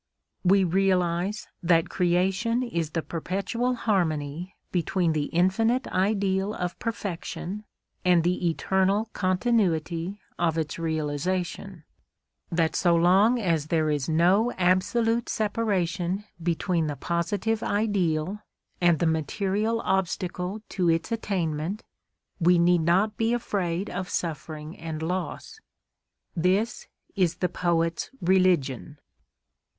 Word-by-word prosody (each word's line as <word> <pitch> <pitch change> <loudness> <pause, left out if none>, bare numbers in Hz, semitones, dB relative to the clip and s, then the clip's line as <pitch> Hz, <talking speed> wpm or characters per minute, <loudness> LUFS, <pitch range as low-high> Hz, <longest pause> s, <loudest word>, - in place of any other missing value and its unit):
We 195 +1 +5
realise 185 +2 +1
that 165 -1 +3
Creation 190 +7 +1
is 170 -10 -2
the 165 0 -2
perpetual 195 +9 -2
harmony 175 -6 -1 0.2
between 175 -1 +1
the 150 -2 0
infinite 225 - +2
ideal 195 +1 0
of 180 -1 -4
perfection 205 -1 -4 0.4
and 180 -2 +4
the 175 0 +1
eternal 195 +6 +1
continuity 185 -3 0 0.2
of 165 -2 +1
its 160 0 -2
realisation; 165 +3 -2 0.7
that 165 -1 +1
so 175 -2 +3
long 195 +8 +4
as 165 -7 0
there 155 -1 +1
is 145 0 -1
no 185 +9 +3
absolute 225 +6 +1
separation 195 -4 -1 0.2
between 170 0 0
the 145 - -3
positive 195 +8 -1
ideal 200 -4 0 0.4
and 175 -2 +4
the 170 - 0
material 200 +8 0
obstacle 190 +1 -2
to 180 -3 +1
its 165 +6 0
attainment, 185 -3 -2 0.6
we 175 0 +5
need 175 0 +4
not 190 +6 +2
be 225 +1 +1
afraid 195 -5 -1
of 180 0 -4
suffering 155 -1 -4
and 160 -1 -5
loss. 180 - -4 0.8
This 195 - 0 0.3
is 180 -5 +2
the 180 - -1
poet's 165 -2 0
religion. 175 - +2
180 Hz, 110 wpm, -26 LUFS, 165-200 Hz, 0.8 s, We